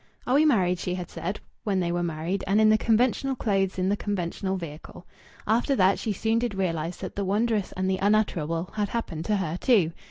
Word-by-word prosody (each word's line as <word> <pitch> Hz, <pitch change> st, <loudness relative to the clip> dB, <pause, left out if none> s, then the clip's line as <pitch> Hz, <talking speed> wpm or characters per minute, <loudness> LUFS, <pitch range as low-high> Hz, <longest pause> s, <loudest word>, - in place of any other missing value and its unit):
"Are 250 Hz, -, 0 dB
we 295 Hz, +3 st, +5 dB
married?" 185 Hz, -, +3 dB
she 180 Hz, 0 st, -2 dB
had 180 Hz, -2 st, -6 dB
said, 190 Hz, +4 st, -4 dB, 0.2 s
when 200 Hz, -3 st, 0 dB
they 175 Hz, -1 st, 0 dB
were 175 Hz, 0 st, -1 dB
married 170 Hz, +3 st, -2 dB
and 200 Hz, +3 st, +3 dB
in 215 Hz, 0 st, +6 dB
the 215 Hz, -, +5 dB
conventional 250 Hz, +4 st, +2 dB
clothes 195 Hz, -5 st, 0 dB
in 185 Hz, 0 st, 0 dB
the 200 Hz, -, +2 dB
conventional 190 Hz, -1 st, -2 dB
vehicle. 165 Hz, 0 st, -9 dB, 0.4 s
After 240 Hz, +6 st, +2 dB
that 190 Hz, -2 st, +3 dB
she 220 Hz, -, -2 dB
soon 225 Hz, +3 st, +1 dB
did 235 Hz, -4 st, -2 dB
realize 170 Hz, -3 st, -2 dB
that 185 Hz, -, -7 dB
the 200 Hz, -, -1 dB
wondrous 210 Hz, +1 st, 0 dB
and 185 Hz, 0 st, -2 dB
the 190 Hz, 0 st, 0 dB
unutterable 185 Hz, -5 st, +1 dB
had 210 Hz, -2 st, -1 dB
happened 170 Hz, -9 st, -4 dB
to 210 Hz, -, +1 dB
her 170 Hz, -4 st, -2 dB
too. 205 Hz, -11 st, +4 dB
195 Hz, 215 wpm, -26 LUFS, 175-215 Hz, 0.4 s, in